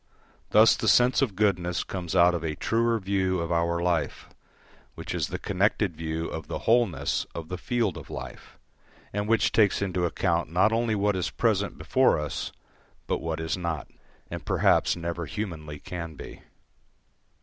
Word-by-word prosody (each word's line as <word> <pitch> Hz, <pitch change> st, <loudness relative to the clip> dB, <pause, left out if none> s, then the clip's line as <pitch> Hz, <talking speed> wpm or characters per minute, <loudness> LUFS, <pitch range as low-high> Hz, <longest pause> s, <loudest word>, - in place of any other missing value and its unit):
Thus 110 Hz, +1 st, +6 dB
the -, -, -3 dB
sense 125 Hz, +2 st, +5 dB
of 120 Hz, -8 st, 0 dB
goodness 90 Hz, -3 st, +1 dB
comes 90 Hz, -1 st, -5 dB
out 90 Hz, 0 st, +6 dB
of 85 Hz, -2 st, -3 dB
a 80 Hz, -2 st, -2 dB
truer 115 Hz, +4 st, +1 dB
view 95 Hz, -2 st, 0 dB
of 85 Hz, +1 st, -3 dB
our 85 Hz, 0 st, +1 dB
life, 85 Hz, -5 st, -1 dB, 0.7 s
which -, -, -6 dB
is -, -, -1 dB
the -, -, -4 dB
connected 100 Hz, -1 st, 0 dB
view 80 Hz, +1 st, -3 dB
of 80 Hz, -2 st, -6 dB
the -, -, -3 dB
wholeness 115 Hz, -7 st, +2 dB
of 80 Hz, -1 st, -6 dB
the 90 Hz, -, -3 dB
field 115 Hz, -7 st, -1 dB
of -, -, -10 dB
life, -, -, -9 dB, 0.6 s
and 105 Hz, +1 st, -2 dB
which 115 Hz, -1 st, +3 dB
takes 105 Hz, -3 st, +3 dB
into 90 Hz, -3 st, 0 dB
account 85 Hz, -1 st, 0 dB
not 95 Hz, +5 st, +3 dB
only 115 Hz, -1 st, +1 dB
what 105 Hz, 0 st, +1 dB
is 90 Hz, -, -1 dB
present 105 Hz, -4 st, 0 dB
before 130 Hz, -, +3 dB
us 75 Hz, -1 st, -4 dB, 0.5 s
but -, -, -1 dB
what 80 Hz, 0 st, -3 dB
is 80 Hz, 0 st, -1 dB
not, 85 Hz, -6 st, -4 dB, 0.4 s
and -, -, -5 dB
perhaps -, -, +3 dB
never 85 Hz, -1 st, -4 dB
humanly 75 Hz, -3 st, -5 dB
can 85 Hz, -1 st, -7 dB
be. -, -, -10 dB
90 Hz, 170 wpm, -27 LUFS, 85-105 Hz, 0.7 s, Thus